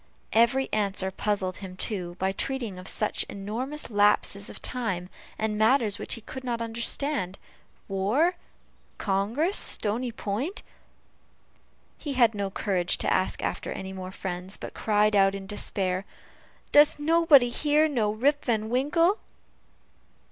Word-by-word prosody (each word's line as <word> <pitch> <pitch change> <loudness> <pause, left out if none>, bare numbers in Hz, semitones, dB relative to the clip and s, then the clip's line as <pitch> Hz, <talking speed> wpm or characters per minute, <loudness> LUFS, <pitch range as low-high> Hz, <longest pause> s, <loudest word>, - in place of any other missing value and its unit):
Every 240 +4 +4
answer 195 -2 0
puzzled 190 -2 -1
him 185 -2 -9
too, 180 -5 -1
by 190 +1 0
treating 230 -2 -3
of 185 - -10
such 215 - 0
enormous 235 +9 -5
lapses 205 -1 +2
of - - -9
time, 190 -8 -3 0.3
and 220 0 -1
of - - -3
matters 220 -2 +3
which - - -2
he 230 - -10
could 260 +4 -8
not 240 -2 -2
understand: 230 -2 -1 0.5
war 215 - +2 0.6
Congress 225 - 0
Stony 235 +4 0
Point; 230 - -4 1.4
he 290 - -4
had 235 -4 +4
no 200 -1 -2
courage 190 -2 0
to - - 0
ask 185 - 0
after - - -3
any 190 0 -6
more 185 -1 -7
friends, 185 0 -5
but - - -8
cried 210 0 +2
out 195 0 +4
in 195 -1 -6
despair, 195 -2 -1 0.7
"Does 295 +1 +6
nobody 300 -4 +5
here 300 +4 +2
know 235 -8 0
Rip 280 +7 +1
Van 220 -2 0
Winkle?" 330 - +2
215 Hz, 140 wpm, -27 LUFS, 195-265 Hz, 1.4 s, Does